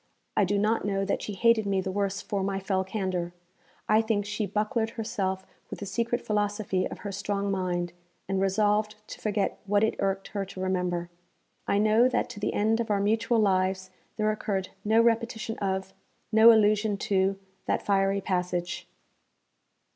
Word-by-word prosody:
I 205 - +4
do 200 +2 0
not 215 +3 +1
know 195 -1 0
that 200 - -1
she 210 - -5
hated 225 0 +3
me 195 -1 +1
the 190 - -2
worse 200 0 -1
for 200 -3 -2
my 195 0 -1
fell 190 -1 0
candour. 185 -3 -3 0.5
I 215 +1 +5
think 220 -2 0
she 210 0 -2
bucklered 220 +2 0
herself 195 -4 -2 0.2
with - - -6
the 205 - -6
secret 235 +5 -1
philosophy 205 -2 0
of - - -9
her 200 - -2
strong 200 0 -2
mind, 175 -2 -1 0.3
and 190 0 0
resolved 210 +2 +2
to - - -9
forget 210 -1 -1
what 205 +1 +3
it 220 - +2
irked 195 0 -1
her 200 -1 -2
to 190 -1 -9
remember. 180 -2 -1 0.6
I 200 - +2
know 215 +4 +4
that 250 - -1
to 220 - -9
the 210 - -1
end 220 +2 +2
of 230 - -2
our 205 -1 +2
mutual 220 +3 +2
lives 190 -2 +1 0.3
there 215 0 +2
occurred 195 -3 -2
no 220 +2 +3
repetition 230 -1 0
of, 190 -1 -2 0.4
no 220 +1 +8
allusion 210 -1 +3
to, 195 0 +2 0.3
that - - 0
fiery 195 0 +2
passage. 180 -2 -2
200 Hz, 175 wpm, -28 LUFS, 190-215 Hz, 0.6 s, no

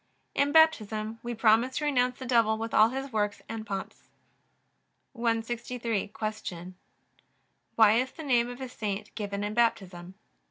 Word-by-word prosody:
In 285 0 +1
Baptism 225 -9 +3
we 240 0 -5
promise 225 +3 +3
to 300 - -1
renounce 250 -3 +1
the 260 - -7
devil 230 -3 +3
with 225 +1 -5
all 215 +1 +6
his 270 0 -5
works 210 -1 -1
and 225 -1 -6
pomps. 195 -1 -6 1.0
163. 230 -1 -2 0.4
Q. 175 +1 -7 1.0
Why 220 -2 +6
is 260 +1 -2
the 320 - -9
name 245 -4 +2
of 245 +2 -9
a 260 - -4
saint 210 -3 -5
given 200 -1 -4
in 205 +1 -3
Baptism? 190 -6 -1
225 Hz, 150 wpm, -28 LUFS, 210-250 Hz, 1.0 s, all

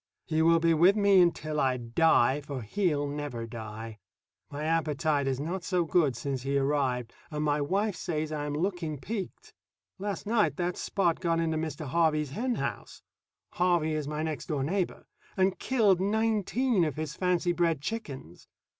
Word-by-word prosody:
He 160 0 0
will 165 +1 +5
be 165 0 +3
with 175 +5 +5
me 200 -3 +5
until 155 -3 +1
I 130 -2 +2
die, 130 +2 +3
for 140 -4 -6
he'll 150 - 0
never 145 -5 -4
die. 110 -1 -8 0.5
My 145 +1 -5
appetite 155 -2 +1
is 135 -1 -1
not 170 +5 -3
so 180 0 0
good 155 -6 +2
since 135 +1 -3
he 140 +2 0
arrived, 135 -4 0 0.2
and 150 -2 -3
my 145 0 +1
wife 195 +7 0
says 155 -4 -3
I 150 -1 -3
am 145 - -3
looking 170 -2 -2
peaked. 200 +6 -6 0.5
Last 200 -2 -4
night 215 0 +2
that 175 -1 -1
Spot 175 -4 0
got 165 -2 +1
into 165 -1 0
Mr. 155 -1 -4
Harvey's 155 -1 +1
hen 240 - -1
house - - -5 0.5
(Harvey 175 -3 +1
is 155 -2 -2
my 150 +1 -3
next 155 -2 -4
door 145 -5 -1
neighbor) 180 +5 -2 0.3
and 190 0 +2
killed 210 -8 +3
nineteen 220 +1 +1
of 155 -5 -1
his 155 -2 -4
fancy 180 -1 +1
bred 170 -3 +1
chickens. 140 - -6
160 Hz, 170 wpm, -29 LUFS, 145-180 Hz, 0.5 s, will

